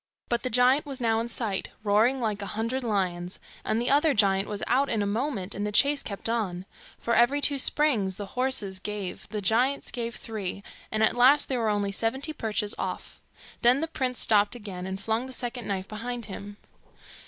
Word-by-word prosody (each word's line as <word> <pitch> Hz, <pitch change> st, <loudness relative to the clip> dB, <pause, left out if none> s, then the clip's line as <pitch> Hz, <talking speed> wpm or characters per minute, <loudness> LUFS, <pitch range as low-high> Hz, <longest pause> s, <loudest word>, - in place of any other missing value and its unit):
But 235 Hz, -1 st, +1 dB
the 255 Hz, -, -2 dB
giant 255 Hz, +5 st, +3 dB
was 275 Hz, -2 st, -6 dB
now 225 Hz, -2 st, +2 dB
in 230 Hz, -, -2 dB
sight, 220 Hz, -5 st, -2 dB
roaring 220 Hz, +6 st, +3 dB
like 215 Hz, -4 st, -1 dB
a 200 Hz, -, -4 dB
hundred 240 Hz, +4 st, -1 dB
lions, 185 Hz, -5 st, -1 dB, 0.3 s
and 220 Hz, -, 0 dB
the 240 Hz, +2 st, +1 dB
other 290 Hz, +1 st, +4 dB
giant 195 Hz, -2 st, +3 dB
was 205 Hz, -1 st, -4 dB
out 270 Hz, +4 st, +2 dB
in 220 Hz, -3 st, +1 dB
a -, -, -1 dB
moment, 205 Hz, -2 st, -2 dB
and 205 Hz, -, -4 dB
the 210 Hz, -, -1 dB
chase 280 Hz, +7 st, +4 dB
kept 200 Hz, 0 st, -5 dB
on. 195 Hz, -6 st, -2 dB, 0.3 s
For 235 Hz, -, -1 dB
every 240 Hz, +5 st, +4 dB
two 285 Hz, -1 st, +3 dB
springs 245 Hz, -11 st, +2 dB
the 205 Hz, -, -6 dB
horses 250 Hz, -7 st, 0 dB
gave, 205 Hz, -1 st, -5 dB
the 210 Hz, -1 st, -4 dB
giants 250 Hz, +8 st, +2 dB
gave 235 Hz, -2 st, -4 dB
three, 200 Hz, -3 st, -5 dB, 0.3 s
and 220 Hz, 0 st, +1 dB
at 220 Hz, -, +3 dB
last 260 Hz, +4 st, +5 dB
they 260 Hz, -, 0 dB
were 225 Hz, -2 st, +1 dB
only 205 Hz, -1 st, 0 dB
seventy 265 Hz, +9 st, -1 dB
perches 215 Hz, -5 st, -2 dB
off. -, -, -5 dB, 0.4 s
Then 245 Hz, +3 st, +5 dB
the 325 Hz, -, -1 dB
prince 260 Hz, -6 st, -2 dB
stopped 210 Hz, +1 st, +3 dB
again, 190 Hz, -5 st, -7 dB
and 190 Hz, 0 st, -4 dB
flung 225 Hz, +5 st, -1 dB
the -, -, -9 dB
second 245 Hz, -1 st, -4 dB
knife 190 Hz, -2 st, -2 dB
behind 235 Hz, +2 st, -5 dB
him. 205 Hz, 0 st, -8 dB
225 Hz, 200 wpm, -27 LUFS, 205-255 Hz, 0.4 s, last